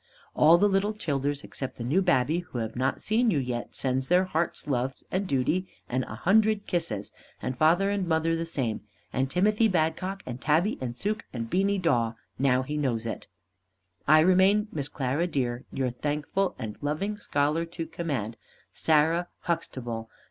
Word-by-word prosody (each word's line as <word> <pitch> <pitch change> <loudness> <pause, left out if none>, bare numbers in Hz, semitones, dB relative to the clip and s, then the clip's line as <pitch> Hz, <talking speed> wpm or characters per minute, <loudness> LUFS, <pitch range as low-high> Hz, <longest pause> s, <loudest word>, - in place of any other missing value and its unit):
All 160 +3 +6
the 205 - +4
little 200 +2 +1
childers 145 -6 -2
except 135 - -6
the 120 - -5
new 145 +11 +2
babby 165 -3 +2
who 175 -8 -8
have 115 -1 -3
not 130 +2 -1
seen 230 +3 +2
you 175 - +2
yet, 125 -3 -3
sends 130 0 -1
their 180 +1 +4
hearts' 170 -2 -2
loves 130 -1 -2
and 190 +1 -1
duty 165 +6 +1 0.2
and 130 +1 -1
a - - -7
hundred 215 +2 +3
kisses, 165 - -2 0.3
and 130 - -3
father 170 +8 +3
and 200 -3 -1
mother 165 0 +2
the 165 0 -3
same, 125 -9 -1 0.3
and 130 0 0
Timothy 210 +7 +3
Badcock, 185 +3 -1
and 125 +1 -6
Tabby, 165 +9 +2
and 120 -2 -4
Suke, 210 +7 -2
and 115 -2 -5
Beany 195 +2 +2
Dawe, 125 -11 +1 0.3
now 130 -1 +3
he 150 +3 -4
knows 120 -6 0
it. 115 - -5 0.8
I 155 +2 +7
remain, 190 +5 +4
Miss 145 -3 -3
Clara 140 +5 -1
dear, 125 -6 -2
your 130 -2 -1
thankful 150 +9 -1
and 110 -4 -6
loving 155 +9 -1
scholar 150 -3 0
to 165 0 -6
command, 140 -10 -3 0.4
SARAH 160 +3 +2
HUXTABLE. 120 -9 -3
155 Hz, 170 wpm, -27 LUFS, 130-185 Hz, 0.8 s, I